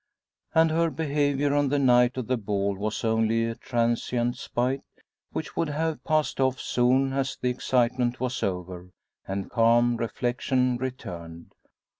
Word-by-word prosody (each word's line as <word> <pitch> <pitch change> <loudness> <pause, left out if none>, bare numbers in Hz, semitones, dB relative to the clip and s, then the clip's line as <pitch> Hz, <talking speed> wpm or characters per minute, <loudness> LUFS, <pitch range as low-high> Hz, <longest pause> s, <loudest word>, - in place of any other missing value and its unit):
and 160 0 +5
her 165 +1 +2
behaviour 145 -2 0
on 145 -1 +2
the 145 - +1
night 125 -2 +4
of 130 - -2
the 130 - +1
ball 100 -3 -1
was 105 +2 -3
only 110 0 +2
a 115 - -2
transient 120 0 -1
spite 125 +2 -2 0.5
which - - -5
would 165 - 0
have 160 +2 -2
passed 155 -3 0
off 130 -1 +1
soon 130 +2 +2
as 135 0 -1
the 125 - 0
excitement 125 0 0
was 130 -1 -2
over, 90 -1 -4 0.4
and 95 0 -4
calm 120 +1 +4
reflection 125 +2 0
returned. 85 -10 -7
125 Hz, 145 wpm, -26 LUFS, 115-135 Hz, 0.5 s, and